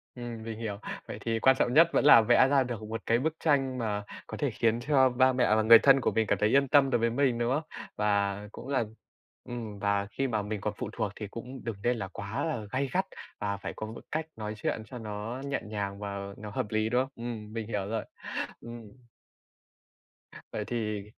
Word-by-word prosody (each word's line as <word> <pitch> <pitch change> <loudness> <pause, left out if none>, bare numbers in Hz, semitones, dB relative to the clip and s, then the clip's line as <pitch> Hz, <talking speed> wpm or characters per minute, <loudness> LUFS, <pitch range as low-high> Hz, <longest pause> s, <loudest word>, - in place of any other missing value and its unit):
Ừm, 120 -2 -6
mình 115 -1 -6
hiểu. 105 -3 -4 0.3
Vậy - - -6
thì 115 -1 -1
quan 130 +3 +5
trọng 120 - +2
nhất 165 +3 +8
vẫn - - +3
là 115 -6 +9
vẽ 120 +4 +5
ra 135 -1 +4
được 120 -3 -5
một 110 +1 -5
cái 115 +1 +3
bức 155 +3 0
tranh 135 -4 +2
mà 105 -3 -2 0.2
có - - -6
thể - - 0
khiến 115 0 +1
cho 130 0 +4
ba 130 +1 +3
mẹ 125 -4 +3
và 110 - +3
người 115 +1 +9
thân 135 -1 +5
của - - +1
mình 110 -2 +1
cảm - - +2
thấy 105 - +3
yên 140 +1 +4
tâm 140 -1 +5
đối 120 -2 +2
với 115 0 +2
mình, 125 -1 +1
đúng 120 +1 0
không? 155 +3 0 0.3
Và 100 -1 +1
cũng - - -10
là 130 -4 +1 0.6
ừm, 115 -5 -6
và 100 -1 +1
khi 135 +6 -1
mà 110 -4 0
mình 105 -1 -4
còn 105 0 -2
phụ - - -4
thuộc 100 - -2
thì 105 - -6
cũng 125 +3 -8
đừng 115 -2 -3
nên 120 0 +2
là 95 -3 -4
quá 110 - -4
là 120 -10 -3
gay 135 +1 0
gắt 190 +1 +2 0.3
và 100 -1 -2
phải - - -6
có 110 - -5
một 110 - -8
cách 155 0 -1
nói 105 -1 -4
chuyện 110 +1 -2
cho 125 - -9
nó 110 +3 -5
nhẹ 140 0 -1
nhàng 100 -2 -4
và 100 -1 -4 0.2
nó 105 0 -7
hợp 105 - -2
lý, 110 0 0
đúng 125 +2 +3
không? 135 - -3
Ừm, 115 -2 -6
mình 115 -2 -4
hiểu 100 -3 -2
rồi. 110 +1 -2 0.6
Ừm. 120 0 -8 1.7
Vậy - - -3
thì 105 -4 -2
115 Hz, 230 wpm, -29 LUFS, 105-130 Hz, 1.7 s, là